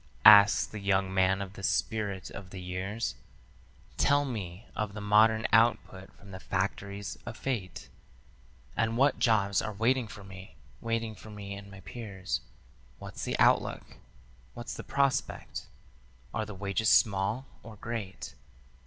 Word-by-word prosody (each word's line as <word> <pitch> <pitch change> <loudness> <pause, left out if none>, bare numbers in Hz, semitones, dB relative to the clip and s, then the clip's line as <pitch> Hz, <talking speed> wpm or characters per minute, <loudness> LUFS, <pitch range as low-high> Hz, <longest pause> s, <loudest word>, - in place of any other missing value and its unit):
asks 105 -1 +9
the 110 - -8
young 95 -1 +1
man 95 +1 +2
of 95 0 -10
the 100 - -10
Spirit 100 -1 -1
of 100 -2 -9
the 95 - -8
Years; 95 +5 -3 0.8
"Tell 145 0 +3
me 100 -5 -6
of 105 -1 -3
the - - -5
modern 110 +2 +4
output 115 -4 +2
from 100 - -14
the 95 - -7
factories 100 +2 -3
of - - -7
fate, 115 -9 -4 0.9
And 115 0 0
what 140 +3 +3
jobs 105 -4 +3
are 110 - -4
waiting 115 +3 +1
for 100 -1 -11
me, 95 -3 -11 0.2
waiting 115 -1 -2
for 110 - -13
me 100 -1 -7
and 100 0 -9
my 95 -1 -12
peers. 100 -3 -5 0.6
What's - - -8
the - - -1
outlook? - - +3 0.7
What's 120 - -6
the - - -7
prospect? 140 -1 -1 0.7
Are 110 -1 -2
the 105 - -7
wages 100 +3 0
small 105 +4 +3 0.2
or 110 -1 -11
great?" 100 -4 -6
100 Hz, 145 wpm, -30 LUFS, 95-115 Hz, 0.9 s, asks